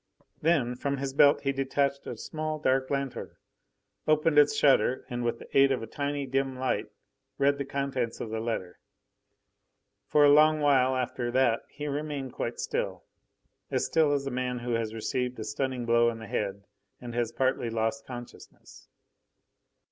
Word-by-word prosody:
Then 145 -7 +2
from 140 +2 -2
his 135 0 -3
belt 145 +1 +5
he 140 - 0
detached 140 +1 -1
a 120 - -5
small 155 +5 -4
dark 130 -2 +1
lanthorn, 140 -2 -3 0.7
opened 155 0 +4
its 145 0 +5
shutter, 140 -3 +3
and 120 0 -2
with 120 0 -1
the - - -14
aid 135 0 +6
of 135 - +1
the - - -4
tiny, 140 +3 -3
dim 135 0 -1
light 130 0 -1 0.5
read 140 +1 +2
the 140 - -2
contents 135 -4 -2
of 110 - -5
the 110 - -2
letter. 110 -6 -4 1.3
For 150 -1 +5
a 145 - +7
long 155 +1 +6
while 130 -3 +3
after 125 -1 -2
that 125 -3 +2
he 150 - -7
remained 145 -2 -4
quite - - -4
still, - - -3 0.7
as - - 0
still 160 -3 +3
as 140 -1 0
a 135 - -3
man 125 0 -2
who 120 0 -4
has 115 -2 -1
received 125 +3 -2
a 110 - -4
stunning 125 +3 -3
blow 120 0 +4
on 115 - -5
the 110 - -9
head 100 -1 -3 0.4
and 120 -1 -8
has 120 -1 -1
partly 130 -2 0
lost 115 +4 -1
consciousness. 120 -1 -11
130 Hz, 170 wpm, -28 LUFS, 120-140 Hz, 1.3 s, a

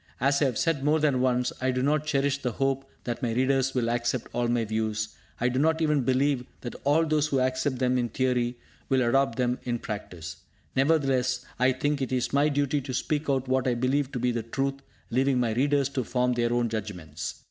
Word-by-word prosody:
As 140 +3 +2
I - - +5
have 130 - 0
said 165 -5 +1
more 150 +2 +3
than 145 -4 +2
once, 125 -1 +1
I 130 - +1
do 130 0 0
not 150 +2 +1
cherish 140 -1 +1
the 125 -4 -2
hope 135 +2 -1
that 120 -1 -4
my 120 -2 0
readers 130 +2 +1
will 120 -2 +1
accept 120 +1 -1
all 120 0 0
my 120 -1 +1
views; 110 0 -1 0.3
I 125 - +2
do 125 +1 0
not 160 +2 +2
even 150 -3 +2
believe 130 +1 +1 0.2
that 120 - -5
all 150 +4 +3
those 155 -1 +1
who 140 -3 +1
accept 130 +1 0
them 125 0 +1
in 120 -1 -1
theory 125 0 0 0.3
will 130 -2 +3
adopt 135 -1 +2
them 125 -1 0
in 120 -1 -1
practice. 90 -7 -6 0.4
Nevertheless, 135 -3 +2
I 130 +1 +4
think 145 +2 -1
it 130 -1 -1
my 145 +2 +4
duty 145 0 0
to 130 -1 -5
speak 150 +3 -1
out 135 -1 +1
what 130 0 +1
I 125 - +2
believe 130 +3 0
to - - -2
be 125 +1 +1
the 115 -1 -2
truth, 135 +4 -2 0.3
leaving 130 +1 +2
my 115 -3 +1
readers 140 +2 +2
to 130 -2 -2
form 125 +1 +1
their 120 -1 0
own 120 0 +2
judgments. 90 -8 -5
130 Hz, 215 wpm, -27 LUFS, 120-140 Hz, 0.4 s, I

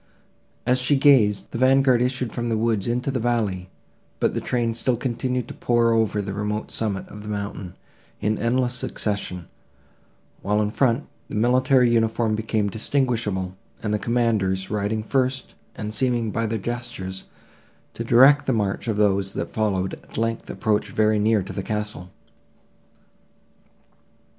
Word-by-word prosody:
As 125 +1 +3
she 130 +3 +3
gazed, 130 -8 +4
the 115 - -4
vanguard 130 -1 +4
issued 125 -1 -1
from 120 -1 -2
the 115 - +1
woods 110 -2 0
into 125 +3 -1
the 130 - -1
valley, 105 -6 -1 0.5
but - - +1
the - - -2
train 120 -2 0
still 120 +1 0
continued 125 0 -2
to - - -7
pour 120 -1 +2
over 110 -2 +1
the 100 0 -4
remote 105 +1 -3
summit 105 -4 -2
of 105 - -10
the 105 - -8
mountain, 100 -3 -5 0.4
in 110 +1 0
endless 125 +2 +1
succession; 100 -7 -3 0.9
while, 105 +2 +1
in 105 -1 +1
the - - -10
front, 130 0 +2 0.2
the - - -6
military 125 +2 +3
uniform 115 -1 +1
became 110 -1 0
distinguishable, 110 -5 -1 0.3
and 105 -1 -1
the 105 - +1
commanders, 105 -5 0
riding 105 +1 -1
first, 130 +2 -1 0.2
and 105 0 -5
seeming, 120 -2 0
by 115 +1 -1
their 110 +1 -1
gestures, 110 -4 -5 0.7
to 115 - -4
direct 135 +5 +6
the 130 - +3
march 105 0 -1
of 110 -2 0
those 100 -2 +2
that - - -4
followed, 95 -4 0
at - - -11
length, 115 +1 -2
approached 110 -2 0
very 110 0 +2
near 105 -1 +2
to 95 - -8
the 100 - -3
castle. 105 -3 -4
110 Hz, 155 wpm, -23 LUFS, 105-120 Hz, 0.9 s, direct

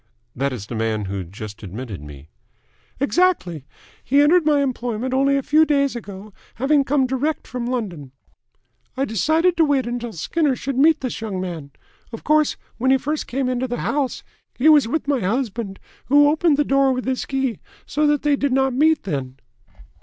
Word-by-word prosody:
"That 140 +2 -1
is 115 -6 -6
the 120 - -8
man 110 -2 -1
who 95 0 -4
just 105 +4 -9
admitted 105 - -7
me?" 75 -1 -12 0.7
"Exactly. 280 - +1 0.4
He 280 +2 +2
entered 310 +3 +4
my 290 -2 +3
employment 245 -1 -3
only 275 +1 +3
a 275 - -2
few 310 +4 +4
days 280 -3 +1
ago, 205 -2 -9 0.2
having 280 +4 +2
come 270 0 +1
direct 265 +4 -2
from 245 -1 -5
London. 190 - -4 0.9
I 270 - +1
decided 315 - +1
to 330 - +5
wait 280 -4 +1
until 240 -1 -4
Skinner 275 - 0
should 275 +2 -4
meet 315 +2 +4
this 255 -3 -4
young 205 -4 -4
man. 170 -6 -5 0.4
Of 225 - -8
course, 305 0 +2 0.2
when 260 +2 +1
he 265 - +5
first 295 +3 -3
came 265 +1 -2
into 255 0 -1
the 245 0 -4
house, 280 -3 -2 0.3
he 290 +5 +4
was 295 -6 +6
with 300 +4 -2
my 280 -2 +1
husband, 215 -1 -2 0.3
who 290 +2 +5
opened 310 -1 +2
the 295 - +3
door 275 -1 +3
with 255 0 -4
his 260 0 -1
key, 265 -5 -1 0.3
so 300 0 0
that 295 -1 +1
they 295 -1 +3
did 280 0 -1
not 265 0 +2
meet 310 +4 +3
then." 135 -7 -4
260 Hz, 185 wpm, -21 LUFS, 195-290 Hz, 0.9 s, was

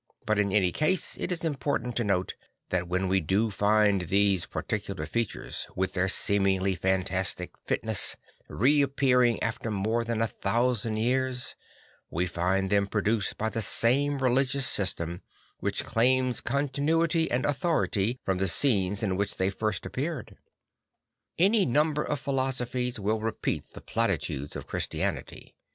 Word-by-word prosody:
But 110 -1 +1
in 100 -1 +1
any 95 -3 +3
case 165 - 0
it - - -2
is 175 -1 -2
important 140 -5 -1
to 120 - +2
note 95 -3 0 0.4
that 90 -1 -1
when 90 +2 0
we 95 +1 +3
do 100 +6 +1
find 105 -1 +3
these 95 +1 +2
particular 100 -2 -3
features, 115 -4 -3
with 95 0 -1
their 95 0 +1
seemingly 95 -1 +1
fantastic 95 0 -1
fitness, 110 -5 0 0.3
reappearing 130 -3 +3
after 115 0 -2
more 110 +3 0
than 115 -1 -2
a 115 - +3
thousand 115 +1 0
years, 125 +2 0 0.6
we 85 +3 0
find 90 +3 0
them 100 -1 +3
produced 105 +1 0
by 110 - 0
the 115 - -2
same 140 +7 +2
religious 135 +1 +1
system 90 -6 -1 0.4
\vhich - - -1
claims 125 +2 +2
continuity 150 +5 +1
and 120 0 0
authority 130 - 0
from 95 -1 0
the 95 - +1
scenes 100 -2 +1
in 95 -3 0
which 100 0 -2
they 95 +1 +1
first 110 +2 -2
appeared. 145 +1 -4 1.0
Any 200 +4 +4
number 150 +3 +2
of 145 - -2
philosophies 130 -3 -1
will 105 +2 0
repeat 110 0 -3
the - - -10
platitudes 70 +2 -2
of - - -6
Christianity. - - -4
110 Hz, 140 wpm, -28 LUFS, 95-130 Hz, 1.0 s, Any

